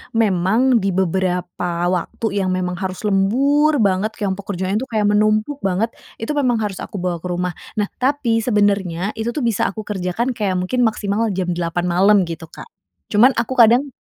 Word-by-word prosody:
memang 225 +4 +3
di 195 -2 -1
beberapa 180 -1 -1
waktu 200 +4 -2
yang 185 -1 0
memang 180 -1 -3
harus 190 0 -4
lembur 260 +8 +2
banget, 195 +2 0
yang 195 - +1
pekerjaannya 190 0 -2
itu 260 - -5
kayak 215 -4 0
menumpuk 215 +6 +1
banget. 195 +3 0 0.2
Itu 225 - -4
memang 250 -6 +1
harus 200 -3 -4
aku - - -8
bawa 175 -2 -1
ke 180 - -6
rumah. 180 0 -2 0.2
Nah, 210 -2 -1
tapi 260 -4 +1
sebenernya 205 -5 +1
itu 235 +2 -2
tuh 295 - -2
bisa 230 -4 +1
aku 215 +2 -5
kerjakan, 205 +4 -2
kayak 205 -6 -1
mungkin 225 +7 +1
maksimal 215 +1 -1
jam 180 -1 -1
08:00 175 0 -2
malam 195 +3 +4
gitu, 165 -1 -7
Kak. 170 - -12 0.4
Cuman 240 +5 +5
aku 245 +3 -2
kadang 240 +5 +5
205 Hz, 175 wpm, -19 LUFS, 185-230 Hz, 0.4 s, Cuman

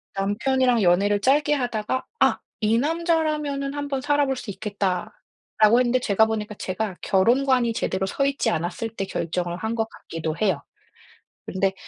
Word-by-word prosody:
남편이랑 235 +5 +1
연애를 200 +3 +3
짧게 295 +4 +3
하다가 245 -2 -1 0.2
'아 - - +3 0.2
이 220 +1 +2
남자라면은 305 -2 0
한번 285 -2 -3
살아 290 +1 +2
볼 270 -1 -1
수 240 - -8
있겠다.'라고 210 +3 0
했는데 250 0 +2
제가 220 -2 +3
보니까 215 -1 -3
제가 190 0 -3
결혼관이 240 +4 +3
제대로 190 -3 -1
서 275 +8 -1
있지 275 0 0
않았을 175 +7 -2
때 195 - -2
결정을 175 0 -3
한 220 +4 -3
것 225 -1 0
같기도 160 -1 -5
해요. 190 -9 +1 0.9
근데 190 0 0
220 Hz, 335 characters per minute, -24 LUFS, 195-270 Hz, 0.9 s, 연애를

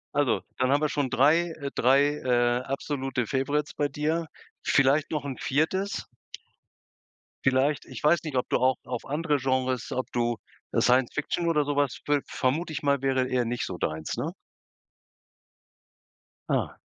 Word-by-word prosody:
Also, 145 -6 +2 0.2
dann 130 +1 +2
haben 145 +1 +3
wir 150 - +2
schon 145 -3 -1
3, 160 +7 +4
äh, 140 - -2
3, 140 +4 +4
äh, 120 -2 +2
absolute 135 -3 -2
Favorites 145 +2 -1
bei 145 - 0
dir. 160 +3 -1 0.4
Vielleicht 140 +3 +3
noch 150 -3 -2
'n 135 -3 -4
4.? 190 +8 0 1.4
Vielleicht 135 +2 +2
ich - - -9
weiß 155 +3 +4
nicht, 150 -4 -5
ob 125 - 0
du - - +3
auch 130 +1 +2
auf 125 -2 -5
andere 150 +1 0
Genres 130 -2 -1
ob 130 - -3
du, 120 -1 0 0.3
äh, - - +2
Science 125 0 +3
Fiction 170 +3 -1
oder 150 -3 +2
sowas 145 -3 0
viel 145 -1 +2
vermute 155 +5 -1
ich 155 - -3
mal 140 -2 +2
wäre 130 -1 +1
eher 125 -1 +1
nicht 120 +1 -2
so 90 - -5
deins, 80 -1 -3
ne? - - -2 2.2
Ah. - - 0
140 Hz, 160 wpm, -27 LUFS, 130-150 Hz, 2.2 s, 3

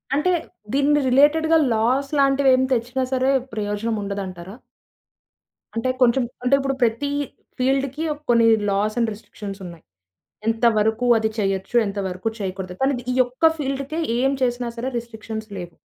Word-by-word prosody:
అంటే 300 +6 +2 0.4
దీన్ని 290 +1 +3
రిలేటెడ్‌గా 315 +5 +4 0.2
లాస్ 255 +5 +1
లాంటివేం 270 -1 +4
తెచ్చినా 250 +2 -1
సరే 260 +1 +2 0.2
ప్రయోజనం 210 +1 -2
ఉండదంటారా? 195 -1 -6 1.2
అంటే 230 +3 0
కొంచెం 250 +1 +4 0.2
అంటే 250 +2 +4
ఇప్పుడు 270 0 -1
ప్రత 230 +2 +1 0.6
ఫీల్డ్‌‌కీ 270 +3 0
ఒక 295 - -14
కొన్ని 235 -1 +5 0.2
లాస్ 205 +2 0
అండ్ 230 - +2
రిస్ట్రిక్షన్స్ 205 -1 -9
ఉన్నాయి. 170 -2 -10 0.6
ఎంతవరకు 225 0 +2
అది 220 0 0
చేయొచ్చు. 195 +1 -2
ఎంతవరకు 195 0 -3
చేయకూడదు. 190 -2 -5
కానీది 265 -2 0
ఈ - - -1
యొక్క 255 +6 +2
ఫీల్డ్‌కే 275 +2 -3 0.2
ఏం 270 +2 +2
చేసినా 245 -1 0
సరే 240 +3 -3
రిస్ట్రిక్షన్స్ 220 -1 -7
లేవు. 175 -1 -8
235 Hz, 130 wpm, -22 LUFS, 210-270 Hz, 1.2 s, కొన్ని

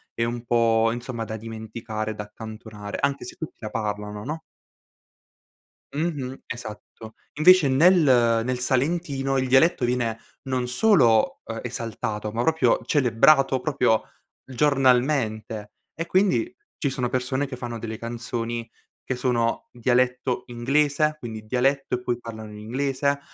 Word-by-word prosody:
e 115 - 0
un 120 0 -4
po', 115 -1 +3
insomma, 120 -1 -4
da 110 +1 -5
dimenticare, 110 0 -5
da 105 - -5
accantonare, 110 -1 -8
anche 140 0 0
se 125 - -8
tutti 160 - -8
la 110 - -5
parlano, 105 -1 -4
no? 155 +6 -4 1.5
Mh-mh. 145 -4 -3
Esatto. 110 -1 -9 0.2
Invece 160 +1 +6
nel 170 +7 +5 0.4
nel 125 +1 -2
salentino, 135 +1 0
il 130 0 0
dialetto 130 +1 +4
viene 120 -2 0 0.3
non 130 -2 -1
solo, 125 - +3
ehm, 115 0 -5
esaltato, 110 -3 -4
ma 115 +2 -1
proprio 160 +2 +3
celebrato, 135 +1 +4
proprio 125 -5 +2 0.4
giornalmente. 125 -6 +1 0.2
E, 165 - -4
quindi, 200 - +2 0.2
ci 140 - 0
sono 125 -2 -2
persone 130 +2 -1
che 135 - -6
fanno 120 -2 -6
delle 110 0 -5
canzoni 115 0 -4 0.4
che 130 - -2
sono 120 -2 0
dialetto 125 +1 +1
inglese, 140 +5 +1
quindi 110 -4 -7
dialetto 130 +3 +1
e 125 - -5
poi 120 -1 -1
parlano 110 -2 -8
in 105 - -10
inglese, 135 +5 -1
125 Hz, 135 wpm, -24 LUFS, 115-135 Hz, 1.5 s, Invece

